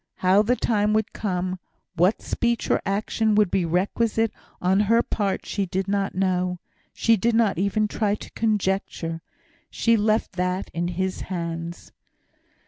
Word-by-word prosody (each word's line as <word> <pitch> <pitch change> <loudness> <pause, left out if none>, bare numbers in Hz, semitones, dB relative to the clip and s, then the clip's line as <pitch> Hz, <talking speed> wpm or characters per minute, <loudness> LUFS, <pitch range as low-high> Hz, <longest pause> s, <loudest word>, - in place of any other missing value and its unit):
How 185 +2 +4
the 235 +4 +2
time 210 -3 +1
would 220 0 0
come 185 -2 -2 0.4
what 180 +5 +2
speech 235 -1 -1
or - - +2
action 215 +2 +1
would 210 -3 +3
be 185 -3 +1
requisite 215 +6 +1 0.3
on 185 +2 +2
her 230 +1 +5
part, 200 -3 -2
she 200 -2 -2
did 190 +1 -2
not 195 -1 -1
know 180 -1 0 0.3
she 230 - +3
did 225 +3 +1
not 220 -6 +2
even 200 +2 +1
try 210 -1 0
to - - -11
conjecture. 190 -6 -1 0.5
She 230 0 +2
left 215 +1 +1
that 180 +1 -1
in 170 +1 -1
His 185 +2 -2
hands. 170 -1 -5
195 Hz, 150 wpm, -24 LUFS, 180-215 Hz, 0.5 s, her